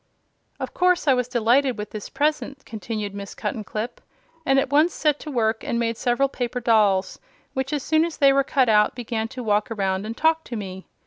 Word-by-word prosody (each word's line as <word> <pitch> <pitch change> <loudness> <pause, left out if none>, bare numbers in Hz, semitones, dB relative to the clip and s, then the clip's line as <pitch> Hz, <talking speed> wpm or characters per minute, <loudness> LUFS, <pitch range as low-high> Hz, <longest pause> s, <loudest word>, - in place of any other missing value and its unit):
"Of - - -5
course 360 -2 +2
I 270 - +6
was 250 -1 0
delighted 245 +2 +2
with 210 0 -6
this 215 -2 -7
present," 285 -1 -1
continued 215 -1 -5
Miss 200 -1 -7
Cuttenclip, 215 +2 -4 0.5
"and 270 0 +4
at 270 0 +1
once 305 +4 +3
set 300 -2 +1
to 310 - -8
work 225 -5 0
and 235 - -2
made 230 -1 0
several 245 +4 +1
paper 250 -2 -3
dolls, 210 -5 +2 0.3
which, 265 0 -2
as 290 -3 -2
soon 315 0 +3
as 335 -1 -3
they 275 -1 +5
were 275 0 +3
cut 265 -2 +2
out, 210 -1 +4
began 230 -2 -3
to 250 +2 -7
walk 210 +1 +1
around 195 -2 -1
and 230 +2 -6
talk 320 0 +2
to 240 - -6
me. 190 -3 -7
240 Hz, 205 wpm, -23 LUFS, 215-275 Hz, 0.5 s, I